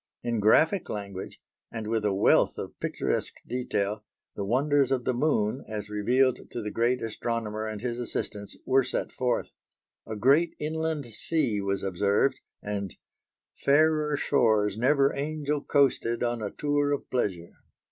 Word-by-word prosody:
In 120 -2 -1
graphic 160 - +3
language, 100 -2 -6 0.3
and 110 -2 -5
with 110 0 -1
a 105 - +3
wealth 95 +1 +3
of - - -7
picturesque - - -2
detail, 105 -4 -2 0.3
the 100 - -3
wonders 135 +5 +2
of 130 -2 +1
the 130 - +1
Moon 125 -3 +1
as 105 -1 -5
revealed 125 +5 +2
to 120 - -5
the 105 - -4
great 120 +2 +1
astronomer 110 -1 -3
and 110 -1 -5
his 120 0 -3
assistants 105 -4 -4
were 135 0 +4
set - - -2
forth. 125 -1 -1 0.6
A 110 - -4
great 140 +10 +3
inland 160 -1 -2
sea 120 -4 0
was 100 0 -2
observed, 100 +8 +1 0.2
and 100 -2 -4 0.6
"fairer 150 +1 +3
shores 110 -8 +2
never 135 +4 +3
angel 150 0 -2
coasted 130 -5 +2
on 120 -1 -1
a 105 - -2
tour 145 +2 0
of 145 - -2
pleasure." 95 -9 -1
120 Hz, 145 wpm, -27 LUFS, 105-140 Hz, 0.6 s, were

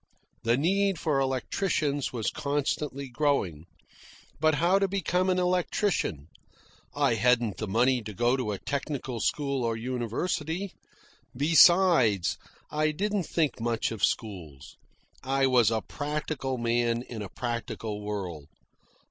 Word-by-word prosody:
The 115 +1 +2
need 195 +5 +2
for 150 -3 0
electricians 140 +2 -1
was 115 -4 -2
constantly 140 -1 -2
growing. 120 - -1 0.7
But 155 0 +3
how 175 +6 +3
to 195 - +2
become 185 -1 0
an 185 - +2
electrician? 180 - 0 0.7
I 140 -4 +2
hadn't 115 -1 +2
the 110 - -4
money 120 +5 +2
to 105 - -6
go 120 +3 +2
to 125 -5 -2
a 100 - -3
technical 135 -1 -4
school 140 +1 -1
or 115 -1 -1
university; 145 - -2 0.6
besides, 155 - +5 0.3
I 155 +1 +1
didn't 200 +3 -1
think 155 -6 0
much 115 -1 0
of 110 -3 -6
schools. 85 - -2 0.5
I 135 +1 +1
was 125 -5 +4
a 110 -1 0
practical 145 -3 -3
man 120 0 0
in 115 -4 -7
a 100 - -6
practical 115 -3 -4
world. 95 -8 -5
130 Hz, 130 wpm, -28 LUFS, 115-155 Hz, 0.7 s, besides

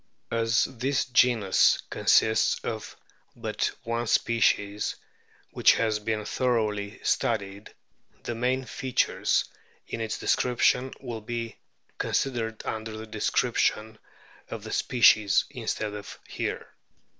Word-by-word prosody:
As 115 0 +2
this 130 +2 -1
genus 120 -5 +4
consists 110 0 +3
of - - -5 0.4
but - - -2
one 115 0 -2
species, 105 -3 +1 0.6
which - - +5
has 110 -2 0
been 105 0 -2
thoroughly 110 -5 -1
studied, 100 0 -1 0.5
the 120 - -3
main 125 +3 -1
features 130 0 0 0.4
in 115 - -5
its 110 -1 -3
description 125 +1 +2
will 120 -4 -6
be 115 +1 -5 0.4
considered 115 -4 -2
under 110 0 -4
the 110 - -7
description 110 0 0 0.5
of - - -6
the - - -7
species 105 -4 +4
instead 105 -1 -3
of 105 -1 -8
here. - - -4
115 Hz, 110 wpm, -27 LUFS, 105-120 Hz, 0.6 s, which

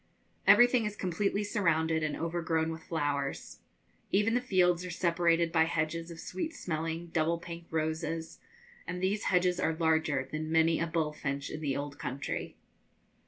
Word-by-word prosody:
Everything 245 -1 +7
is 210 - -5
completely 200 +2 -1
surrounded 165 -6 +1
and 155 -1 -1
overgrown 165 -1 -1
with 160 0 -6
flowers. 145 -4 -2 0.5
Even 210 +3 +3
the 245 - +2
fields 180 -6 +2
are 180 - -5
separated 170 -1 +2
by 160 -1 +4
hedges 165 +1 -2
of 165 -1 -9
sweet 250 - -4
smelling 165 0 -3
double 165 +1 +2
pink 170 0 -9
roses, 160 +1 -2 0.5
and 180 0 -3
these 195 +3 0
hedges 180 -1 +2
are 160 - +1
larger 160 -5 +1
than 155 +1 -3
many 165 0 +4
a 170 - 0
'bull 160 -2 -1
finch' 140 -1 -3
in 155 - -5
the 140 -3 -1
old 145 0 -5
country. 135 +3 -4
165 Hz, 160 wpm, -31 LUFS, 160-180 Hz, 0.5 s, Everything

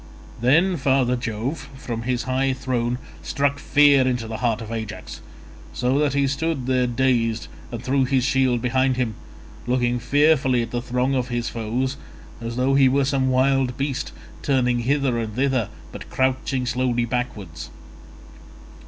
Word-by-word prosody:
Then 165 +9 +4
father 130 -2 +2
Jove 125 +5 -4
from 120 -4 -5
his 120 0 -1
high 130 +1 0
throne 125 -2 -1 0.2
struck 140 +1 0
fear 140 -3 +5
into 120 -3 -1
the 110 0 -4
heart 115 -3 0
of 115 -1 -7
Ajax, 110 -2 -6 0.5
so 130 +3 +1
that 145 -2 +1
he 140 0 +3
stood 140 0 -1
there 130 -1 +2
dazed 120 -3 +1 0.2
and 120 -1 -6
threw 135 0 +2
his 130 -1 +1
shield 130 -2 +2
behind 130 +1 +2
him—looking 125 +1 -3
fearfully 135 -1 +3
at 115 - -7
the 120 - -2
throng 125 +2 0
of 130 -2 0
his 120 -1 -2
foes 120 +4 -2 0.4
as 115 0 -4
though 130 +2 +2
he 135 -1 +5
were 135 +1 +2
some 135 -1 +1
wild 130 -1 +2
beast, 135 -1 -2 0.3
and - - -19
turning 125 -3 +2
hither 130 0 +1
and 110 -2 -4
thither 130 -3 +1 0.2
but - - -9
crouching 130 0 0
slowly 120 -1 0
backwards. 110 -9 -4
130 Hz, 155 wpm, -23 LUFS, 120-135 Hz, 0.5 s, fear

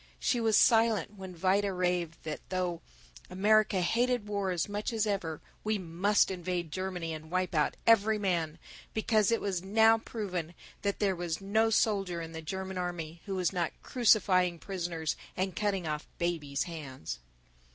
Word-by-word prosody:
She 245 - +1
was 220 -2 +4
silent 225 -5 +4
when 190 -2 -8
Vida 195 +3 +2
raved 180 -2 -1
that 155 -1 -4
though 180 -2 -1 0.5
America 205 +1 +3
hated 240 +5 +1
war 200 -2 -1
as 175 -3 0
much 205 +3 -3
as 220 -2 +1
ever, 185 -7 -2 0.2
we 215 0 +1
must 190 +3 +2
invade 175 -3 -3
Germany 180 -2 -3
and 155 0 -8
wipe 185 +1 -1
out 150 -2 +1
every 220 -1 +5
man, 170 -6 -1 0.4
because 220 -1 +3
it 230 - +2
was 190 -4 -2
now 220 +4 +5
proven 185 -7 -4 0.3
that 200 -1 -1
there 195 -3 +1
was 170 -2 -3
no 220 +3 +2
soldier 195 -5 +1
in 165 -1 -6
the 160 0 -6
German 190 +3 -4
army 170 -2 -4
who 195 - -2
was 185 0 0
not 175 -3 -1
crucifying 185 -7 +3
prisoners 170 -4 -3 0.2
and 185 -1 -1
cutting 200 -4 0
off 150 0 -3
babies' 155 -5 -1
hands. 140 - -6
185 Hz, 160 wpm, -31 LUFS, 170-205 Hz, 0.5 s, every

